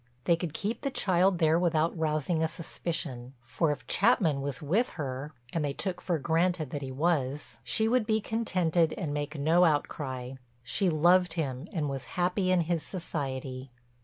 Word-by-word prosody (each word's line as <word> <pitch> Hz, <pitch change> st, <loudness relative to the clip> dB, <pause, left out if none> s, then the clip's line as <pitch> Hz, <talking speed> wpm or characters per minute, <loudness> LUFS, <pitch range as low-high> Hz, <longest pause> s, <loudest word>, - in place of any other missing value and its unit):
They 170 Hz, -, +4 dB
could 165 Hz, -2 st, -5 dB
keep 210 Hz, +4 st, -2 dB
the 275 Hz, -, -1 dB
child 185 Hz, -5 st, +2 dB
there 160 Hz, 0 st, +3 dB
without 165 Hz, -2 st, +1 dB
rousing 160 Hz, 0 st, 0 dB
a 160 Hz, -, +3 dB
suspicion, 160 Hz, -6 st, -5 dB
for 150 Hz, +6 st, 0 dB
if 145 Hz, -, -5 dB
Chapman 185 Hz, -, +3 dB
was 140 Hz, -2 st, -3 dB
with 195 Hz, -, +1 dB
her—and 135 Hz, 0 st, -4 dB
they 145 Hz, -1 st, -1 dB
took 185 Hz, +4 st, -3 dB
for 175 Hz, -3 st, 0 dB
granted 165 Hz, 0 st, 0 dB
that 145 Hz, -, -3 dB
he 135 Hz, -1 st, -5 dB
was—she 135 Hz, -, 0 dB
would 235 Hz, -1 st, +2 dB
be 220 Hz, -1 st, +2 dB
contented 180 Hz, -7 st, +1 dB
and 155 Hz, -6 st, -3 dB
make 150 Hz, +1 st, -3 dB
no 160 Hz, +5 st, +4 dB
outcry. 135 Hz, -5 st, -1 dB, 0.3 s
She 190 Hz, -, +1 dB
loved 175 Hz, +2 st, +4 dB
him 145 Hz, -2 st, -3 dB
and 160 Hz, -7 st, -1 dB
was 135 Hz, -2 st, -4 dB
happy 180 Hz, +1 st, +1 dB
in 185 Hz, -1 st, +4 dB
his 170 Hz, 0 st, 0 dB
society. 135 Hz, -7 st, -5 dB
160 Hz, 165 wpm, -29 LUFS, 140-180 Hz, 0.3 s, They